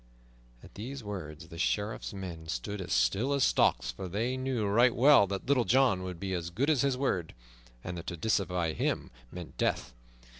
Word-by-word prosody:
At -, -, -14 dB
these 125 Hz, +4 st, -7 dB
words 80 Hz, -6 st, -7 dB
the 85 Hz, -, -9 dB
Sheriff's 105 Hz, +4 st, -1 dB
men 90 Hz, -5 st, -7 dB
stood 80 Hz, +8 st, -4 dB
as 90 Hz, -, -6 dB
still 70 Hz, -, +2 dB
as 140 Hz, -1 st, +2 dB
stocks, -, -, +3 dB
for 95 Hz, -, -7 dB
they 115 Hz, +8 st, -1 dB
knew 130 Hz, -4 st, -1 dB
right 115 Hz, +5 st, +4 dB
well 135 Hz, -4 st, +6 dB
that 95 Hz, 0 st, -4 dB
Little 130 Hz, -2 st, +3 dB
John 125 Hz, -6 st, +3 dB
would 90 Hz, -2 st, -6 dB
be 95 Hz, -1 st, -3 dB
as 85 Hz, -1 st, -3 dB
good 130 Hz, -, +1 dB
as 145 Hz, -, +2 dB
his 140 Hz, -2 st, +1 dB
word, 95 Hz, -11 st, -1 dB, 0.5 s
and 90 Hz, -, -5 dB
that 85 Hz, -, -10 dB
to 85 Hz, -, -4 dB
disobey 90 Hz, -4 st, 0 dB
him -, -, -2 dB, 0.2 s
meant 90 Hz, -3 st, -9 dB
death. 60 Hz, 0 st, 0 dB
100 Hz, 190 wpm, -30 LUFS, 85-125 Hz, 0.5 s, well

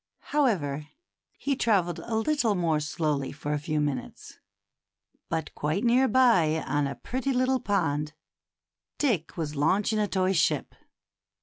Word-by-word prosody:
However, 155 Hz, -, +1 dB, 0.5 s
he 280 Hz, -1 st, -1 dB
travelled 190 Hz, -9 st, +1 dB
a 230 Hz, -, -4 dB
little 230 Hz, -2 st, +1 dB
more 165 Hz, -4 st, +1 dB
slowly 150 Hz, -2 st, -1 dB
for 145 Hz, +1 st, -4 dB
a 150 Hz, -, 0 dB
few 150 Hz, +1 st, -2 dB
minutes. 145 Hz, -4 st, -4 dB, 0.9 s
But 160 Hz, -2 st, -3 dB
quite 155 Hz, +8 st, -1 dB
near 250 Hz, +2 st, +4 dB
by, 185 Hz, -13 st, +3 dB
on 145 Hz, +1 st, 0 dB
a 140 Hz, -, -5 dB
pretty 265 Hz, +2 st, -3 dB
little 255 Hz, 0 st, +2 dB
pond, 155 Hz, -8 st, -1 dB, 0.8 s
Dick 210 Hz, -, 0 dB
was 155 Hz, -2 st, -3 dB
launching 205 Hz, +9 st, +1 dB
a 210 Hz, -, +1 dB
toy 190 Hz, -1 st, +1 dB
ship. 165 Hz, -, +1 dB
175 Hz, 135 wpm, -27 LUFS, 150-235 Hz, 0.9 s, near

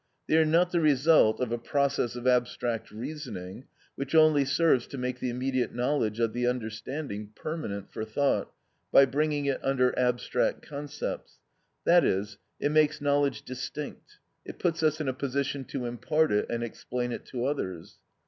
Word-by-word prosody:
They -, -, +2 dB
are 160 Hz, -, +5 dB
not 175 Hz, +3 st, +3 dB
the 175 Hz, -, +2 dB
result 150 Hz, -5 st, +4 dB
of 125 Hz, -2 st, -1 dB
a 120 Hz, -, -1 dB
process 140 Hz, -2 st, 0 dB
of 120 Hz, 0 st, -6 dB
abstract 120 Hz, -2 st, +1 dB
reasoning, 115 Hz, -4 st, -7 dB, 0.3 s
which 140 Hz, +3 st, -4 dB
only 155 Hz, -3 st, +6 dB
serves 135 Hz, -3 st, +3 dB
to 140 Hz, -, -7 dB
make 125 Hz, 0 st, -3 dB
the 125 Hz, -, -2 dB
immediate 125 Hz, 0 st, -1 dB
knowledge 120 Hz, -3 st, 0 dB
of 115 Hz, -2 st, +1 dB
the 120 Hz, 0 st, 0 dB
understanding 110 Hz, -1 st, -4 dB
permanent 105 Hz, -, -5 dB
for -, -, -3 dB
thought 135 Hz, +6 st, 0 dB, 0.4 s
by 135 Hz, -, +8 dB
bringing 145 Hz, +2 st, 0 dB
it 140 Hz, -1 st, -1 dB
under 125 Hz, -2 st, +2 dB
abstract 125 Hz, 0 st, 0 dB
concepts, 145 Hz, 0 st, -6 dB, 0.5 s
i.e., 165 Hz, -, +4 dB, 0.3 s
it 145 Hz, -, 0 dB
makes 155 Hz, 0 st, +3 dB
knowledge 145 Hz, -4 st, +1 dB
distinct, 135 Hz, +3 st, -7 dB, 0.3 s
it -, -, -9 dB
puts 170 Hz, -1 st, 0 dB
us 155 Hz, -1 st, +2 dB
in 155 Hz, -, -2 dB
a 130 Hz, -, +1 dB
position 140 Hz, +1 st, -2 dB
to 130 Hz, -1 st, -4 dB
impart 150 Hz, +6 st, +1 dB
it 105 Hz, 0 st, +1 dB
and 120 Hz, 0 st, -2 dB
explain 120 Hz, +1 st, -4 dB
it -, -, -5 dB
to 125 Hz, -1 st, -3 dB
others. 95 Hz, -, -4 dB
130 Hz, 165 wpm, -28 LUFS, 120-150 Hz, 0.5 s, by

